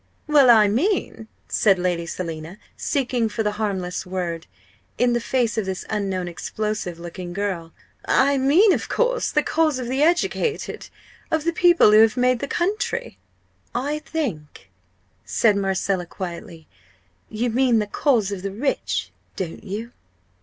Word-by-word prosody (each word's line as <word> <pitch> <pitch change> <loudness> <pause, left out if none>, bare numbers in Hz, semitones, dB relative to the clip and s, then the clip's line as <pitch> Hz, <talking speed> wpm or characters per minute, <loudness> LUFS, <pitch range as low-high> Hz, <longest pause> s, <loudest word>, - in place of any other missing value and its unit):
"Well, 290 -4 +5
I 220 -3 +7
mean 250 - -1
" - - -40
said 195 -3 +3
Lady 175 -2 -1
Selina, 165 +1 -6 0.2
seeking 250 -5 -1
for 220 +1 -2
the 210 - 0
harmless 185 -4 -2
word, 180 -3 -4 0.5
in 245 -1 +2
the 240 - +1
face 235 -2 0
of 200 - -3
this 190 -1 -4
unknown 195 -4 -2
explosive 210 +1 -4
looking 175 +1 -7
girl 185 -4 -3 0.3
"I 280 +1 +3
mean, 340 +10 +5
of - - -3
course, - - +1
the - - +2
cause 315 -4 +1
of 250 -2 -4
the 260 +3 -1
educated 350 +7 0 0.4
of 315 -1 0
the 335 +1 0
people 345 - +5
who 215 - +7
have 225 +2 +4
made 250 0 +2
the 280 - -3
country." 425 - -2 0.6
"I 285 +5 -1
think," 210 - -5 0.5
said 215 -3 +2
Marcella, 195 -2 -1
quietly, 170 -2 -7 0.6
"you 235 +2 -1
mean 250 0 +3
the 210 - +1
cause 220 -2 +1
of 195 -2 -4
the 195 +1 -4
rich, 260 +8 -2 0.2
don't 175 -4 -5
you?" 215 +5 -6
220 Hz, 155 wpm, -22 LUFS, 185-275 Hz, 0.6 s, I